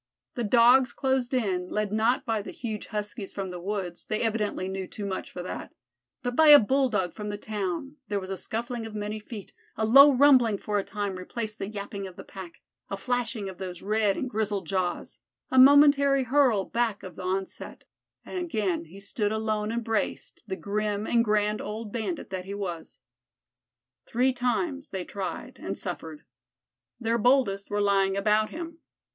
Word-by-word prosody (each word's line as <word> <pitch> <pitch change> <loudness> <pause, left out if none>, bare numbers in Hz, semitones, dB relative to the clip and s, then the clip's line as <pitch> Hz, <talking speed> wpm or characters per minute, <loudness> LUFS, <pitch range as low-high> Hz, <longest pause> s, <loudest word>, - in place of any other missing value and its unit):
The 240 - -3
Dogs 240 +3 +5
closed 265 -2 0
in, 190 -8 0
led 210 -1 -1
not 230 +6 +2
by 225 -3 0
the - - -8
huge 220 -4 -5
Huskies 205 -2 -4
from 195 -2 -4
the 180 -1 -6
woods 185 -2 -4
they 215 - -1
evidently 210 -4 -1
knew 190 -1 -4
too 205 - -7
much 190 -1 -4
for 180 - -7
that 185 - -7 0.5
but 245 0 -2
by 315 +2 +6
a 295 -1 +12
Bulldog 250 -7 +1
from 210 -1 -6
the 205 - -3
town; 210 - -4
there 205 0 -1
was 190 0 -7
scuffling 235 0 -4
of 215 - -10
many 210 +1 -3
feet; 210 -1 -9 0.2
a 220 - +1
low 275 +6 +9
rumbling 255 -5 +5
for 205 +1 -1
a - - -2
time 205 -2 -4
replaced 215 +3 -5
the 195 - -3
yapping 200 -1 -5
of 185 - -12
the - - -9
pack; 185 -3 -11 0.3
a 195 - -3
flashing 235 -2 -2
of 190 -1 -8
those 180 -2 -6
red 210 -1 +1
and 260 - -2
grizzled 210 -2 -1
jaws, 185 -2 -2 0.3
a 260 - +5
momentary 280 0 +7
hurl 250 -6 +3
back 230 -3 -1
of 185 -3 -9
the - - -8
onset, 190 +1 -4 0.4
and 370 - -4
again 215 - -1
he 180 +5 -13
stood 205 +1 -2
alone 215 -1 -1
and 235 +1 -2
braced, 225 -2 -2
the 190 - -3
grim 205 +1 -2
and 235 0 +3
grand 210 -1 +1
old 215 0 -5
bandit 240 - -3
that 185 -1 -4
he 200 +1 -5
was. 180 -5 -6 1.1
Three 255 +3 +2
times 270 +4 -1
they 190 -2 -4
tried 195 -2 -6
and - - -4
suffered. 300 - -5 0.8
Their 230 0 0
boldest 215 -5 +2
were 205 0 0
lying 195 -1 +2
about 215 +1 +2
him. 335 0 -7
215 Hz, 180 wpm, -27 LUFS, 195-245 Hz, 1.1 s, a